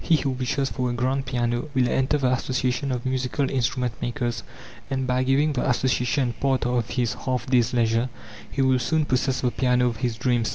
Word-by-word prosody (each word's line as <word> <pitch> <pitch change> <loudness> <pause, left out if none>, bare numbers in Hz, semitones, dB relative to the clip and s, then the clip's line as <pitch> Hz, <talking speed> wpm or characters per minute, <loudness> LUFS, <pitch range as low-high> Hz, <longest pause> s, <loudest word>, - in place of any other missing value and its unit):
He 170 - +4
who 140 -2 -1
wishes 130 +2 -1
for 125 -2 -1
a - - -1
grand 130 +2 -1
piano 120 +2 -1
will 130 -2 +3
enter 135 +4 +1
the 130 -3 +1
association 130 +1 -1
of 125 -1 -3
musical 130 0 -1
instrument 125 -1 0
makers. 120 -1 -2 0.5
And 130 -1 -1
by 125 0 +1
giving 140 +4 +2
the 125 - 0
association 125 0 +1
part 135 -2 +1
of 120 -2 0
his 120 -3 0
half 130 -1 -3
days' 125 -2 +2
leisure, 115 0 +1 0.4
he 135 +7 0
will 130 -1 +3
soon 155 +5 +1
possess 130 0 0
the 125 - +1
piano 125 -1 +2
of 120 -3 0
his 120 0 -1
dreams. 120 -1 +1
125 Hz, 200 wpm, -24 LUFS, 120-130 Hz, 0.5 s, He